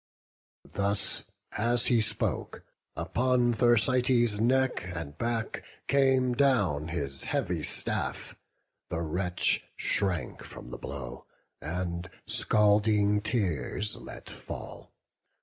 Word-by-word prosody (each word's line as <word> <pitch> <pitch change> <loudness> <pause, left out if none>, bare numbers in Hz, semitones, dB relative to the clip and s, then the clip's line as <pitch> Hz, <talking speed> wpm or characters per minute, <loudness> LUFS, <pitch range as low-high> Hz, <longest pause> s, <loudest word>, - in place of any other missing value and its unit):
Thus 100 0 +1 0.3
as 120 +2 +2
he 120 -2 +4
spoke, 105 -1 -1 0.3
upon 125 -1 +1
Thersites' 120 -1 +3
neck 130 +3 +2
And 75 -4 -6
back 115 +4 -2 0.3
came 130 -2 +3
down 105 - +2
his 70 -5 -3
heavy - - -1
staff; - - -2 0.6
the 80 - -2
wretch 90 +2 0
Shrank 95 -5 0
from - - -10
the - - -7
blow, 65 -3 -7 0.3
and 85 +2 -3 0.2
scalding 105 0 +3
tears 105 - -1
let - - -10
fall. - - -8
105 Hz, 95 wpm, -29 LUFS, 85-120 Hz, 0.6 s, he